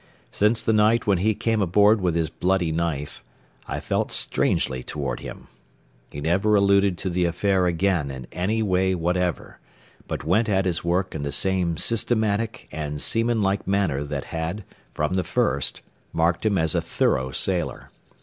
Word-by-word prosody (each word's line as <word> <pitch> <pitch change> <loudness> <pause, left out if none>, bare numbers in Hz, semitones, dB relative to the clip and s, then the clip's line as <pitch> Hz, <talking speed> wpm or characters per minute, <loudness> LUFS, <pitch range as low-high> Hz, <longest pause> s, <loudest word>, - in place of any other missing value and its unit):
Since 105 +3 +2
the 110 - +2
night 110 +2 +3
when 100 -4 +2
he 110 +3 +1
came 115 0 0
aboard 105 +3 +4
with 90 -3 0
his 80 -1 -1
bloody 90 -1 0
knife, 80 -3 -3 0.4
I - - -3
felt - - -2
strangely 65 -1 0
toward 70 0 -4
him. - - -9 0.6
He 70 - -7
never 95 +7 +2
alluded 100 -2 +3
to 95 - -3
the 90 0 +1
affair 90 +2 +1
again 85 -3 0
in 65 -2 -7
any 110 +5 -1
way 95 -1 +1
whatever, 90 +1 -2 0.5
but - - -4
went 110 +7 +1
at 95 -2 +1
his 90 -3 -1
work 90 +2 0
in 80 - -4
the 70 0 -3
same 90 -3 +1
systematic 110 0 0
and 75 -1 -4
seaman 115 +4 +1
like 95 0 -1
manner 95 -8 0
that 70 - -4
had, 85 +6 -3 0.3
from 75 +4 -1
the 95 -1 +1
first, 70 -4 -1 0.3
marked 85 +5 +1
him 100 -2 +1
as 80 -2 +1
a - - +1
thorough 65 0 0
sailor. - - -1
90 Hz, 170 wpm, -24 LUFS, 80-100 Hz, 0.6 s, aboard